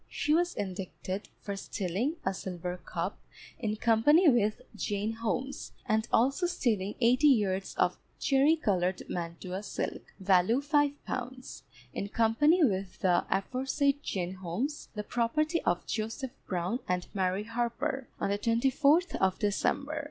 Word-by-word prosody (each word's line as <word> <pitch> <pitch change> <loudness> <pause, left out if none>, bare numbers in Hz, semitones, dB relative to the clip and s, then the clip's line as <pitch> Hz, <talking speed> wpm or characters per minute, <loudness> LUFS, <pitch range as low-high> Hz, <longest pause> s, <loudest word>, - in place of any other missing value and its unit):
She 300 - 0
was 350 +2 +2
indicted 190 0 -5
for 200 -1 -4
stealing 195 - -2
a - - +1
silver 180 -1 -5
cup, - - -4 0.4
in 215 -4 -1
company 240 - +5
with 215 -6 +3 0.2
Jane 205 +1 -1
Holmes, 240 +4 -3
and 220 +1 +1
also 275 +9 +3
stealing 215 - 0
eighty 250 +5 +5
yards 195 -8 +2
of 180 0 +1 0.2
cherry 280 +3 +4
coloured 185 - 0
mantua 175 +2 -4
silk, 210 - -5
value 190 +5 +4
five 290 0 +2
pounds, 255 - -5 0.3
in 200 - -3
company 295 - +4
with 195 -7 0
the 180 -2 +3
aforesaid 270 +7 0
Jane 180 -1 -3
Holmes, 190 - -4
the 210 - -3
property 305 +10 0
of 175 0 +1
Joseph 225 +4 -3 0.2
Brown 185 +6 -1
and 180 0 0
Mary 190 +1 0
Harper, 240 +4 -2
on 200 - 0
the 200 - 0
24th 275 - +3
of 190 -1 +2
December. 280 +8 0
225 Hz, 135 wpm, -30 LUFS, 190-275 Hz, 0.4 s, company